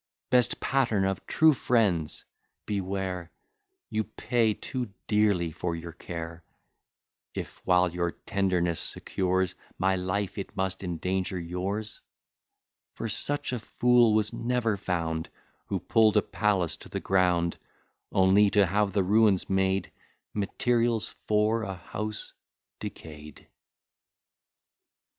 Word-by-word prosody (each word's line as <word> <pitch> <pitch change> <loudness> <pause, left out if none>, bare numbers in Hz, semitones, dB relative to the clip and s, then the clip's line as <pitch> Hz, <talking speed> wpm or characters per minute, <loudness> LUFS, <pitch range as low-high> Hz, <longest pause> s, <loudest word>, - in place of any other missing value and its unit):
Best 125 -1 +3
pattern 115 -8 +1
of 95 0 -2
true 160 -1 +5
friends! 100 - +1 0.4
beware; 95 -3 -3 0.6
You 110 0 +1
pay 110 0 0
too 125 -4 -4 0.2
dearly 100 -6 +2
for 85 +2 -3
your 85 0 -7
care, 85 0 -7 0.9
If, - - -6
while 90 -1 +4
your 85 0 0
tenderness 90 -2 0
secures 95 -1 -1 0.2
My 95 +1 +2
life, 95 +2 -2
it 95 - -7
must 95 0 -1
endanger 90 +2 -2
yours; 95 +6 -4 0.9
For 115 - -3
such 145 +4 -2
a 125 - -1
fool 120 0 +4
was 105 -1 +1
never 115 -2 0
found, 85 -4 -2 0.4
Who - - -1
pull'd 110 -1 +4
a 105 - +4
palace 95 -5 0
to - - -13
the - - -3
ground, 90 -3 +2 0.5
Only 95 +2 +5
to 100 0 +4
have 100 +2 +1
the 100 - +2
ruins 100 -1 +3
made 95 0 +1 0.4
Materials 115 +2 +1 0.2
for 105 +2 +2
a 95 -3 -4
house 105 +5 -5 0.5
decay'd. 75 -1 -9
95 Hz, 115 wpm, -28 LUFS, 90-110 Hz, 0.9 s, true